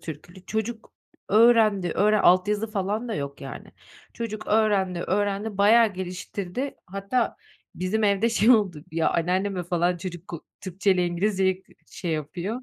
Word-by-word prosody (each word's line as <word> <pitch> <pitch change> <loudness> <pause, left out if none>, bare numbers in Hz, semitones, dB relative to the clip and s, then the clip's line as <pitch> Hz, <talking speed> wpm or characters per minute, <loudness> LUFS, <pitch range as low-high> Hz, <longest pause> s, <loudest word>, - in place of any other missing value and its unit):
türkülü, 175 +4 -10
çocuk 220 +1 -4 0.4
öğrendi, 215 -4 +4
öğren 210 0 +3
altyazı 205 +4 +3
falan 210 +3 -2
da 220 - -2
yok 140 0 -5
yani. - - -8 0.4
Çocuk 215 -2 -6
öğrendi, 200 -5 +2
öğrendi, 205 +2 -1
bayağı 220 +1 +5
geliştirdi. 185 +6 -5
Hatta 200 +6 -2 0.4
bizim 205 +4 -1
evde 205 +3 +2
şey 225 +1 +3
oldu, 195 -10 +3
ya 165 -1 +1
anneanneme 185 +2 0
falan 175 +1 0
çocuk 175 0 -8
k 170 - -5 0.2
Türkçeyle 185 -1 +1
İngilizceyi 190 +1 0
k - - -24 0.2
şey 175 - -5
yapıyor, 175 - -4
195 Hz, 140 wpm, -25 LUFS, 180-215 Hz, 0.4 s, bayağı